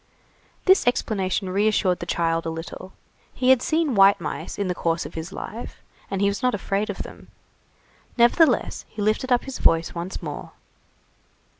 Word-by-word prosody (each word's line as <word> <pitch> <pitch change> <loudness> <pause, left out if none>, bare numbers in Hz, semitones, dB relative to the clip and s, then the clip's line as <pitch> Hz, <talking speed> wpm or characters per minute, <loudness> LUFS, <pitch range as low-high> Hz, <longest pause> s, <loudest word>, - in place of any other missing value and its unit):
This 380 -8 +5
explanation 195 -5 0
reassured 200 -2 +2
the - - -6
child 165 -1 0
a - - 0
little. 165 +3 -7 0.4
He 255 0 +3
had 260 -2 +5
seen 315 -2 +1
white 195 -1 +6
mice 160 0 -5
in 200 - -1
the 180 - 0
course 170 -1 -1
of - - -8
his 165 +3 -6
life, 220 +4 -8 0.3
and 195 -1 -2
he 200 - +4
was 200 -1 -1
not 250 -2 +2
afraid 200 +1 -2
of - - -4
them. - - -12 0.9
Nevertheless, 240 +2 +3
he 215 - -12
lifted 215 +5 0
up 245 - +3
his 270 -1 -7
voice 165 0 +2
once 175 +2 -5
more. - - -7
200 Hz, 170 wpm, -24 LUFS, 175-240 Hz, 0.9 s, white